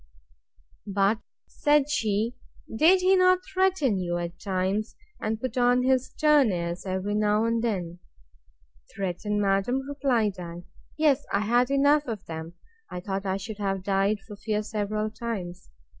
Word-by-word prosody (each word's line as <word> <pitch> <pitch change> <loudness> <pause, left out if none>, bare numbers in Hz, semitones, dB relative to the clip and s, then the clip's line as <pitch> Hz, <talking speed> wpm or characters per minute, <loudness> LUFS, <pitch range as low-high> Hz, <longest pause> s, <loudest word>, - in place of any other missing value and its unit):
But, 200 +2 +2 0.3
said 295 -1 +2
she, 220 -3 0 0.4
did 350 +9 +5
he 375 +1 +5
not 365 0 +4
threaten 370 - +1
you, 175 -1 -2
at 175 0 -5
times, 195 +3 -2 0.2
and 220 0 -2
put 255 +1 -3
on 245 +1 +4
his 260 0 +2
stern 300 -6 +3
airs, 175 +1 -3
every 190 +2 -2
now 210 +1 +2
and 230 0 0
then?—Threaten, 170 - -6
madam, 200 +6 +1
replied 245 -9 0
I; 175 0 -7 0.3
yes, 295 -3 +3
I 200 - +1
had 240 +4 +2
enough 285 +1 +3
of 215 -4 -5
that! 160 -1 -6 0.4
I 180 - -5
thought 195 +1 -4
I 190 0 0
should 210 +2 -7
have 195 -2 -2
died 195 +1 +1
for 205 +1 -11
fear 215 +1 -2
several 215 0 -2
times. 195 -7 -6
210 Hz, 145 wpm, -26 LUFS, 190-250 Hz, 0.4 s, did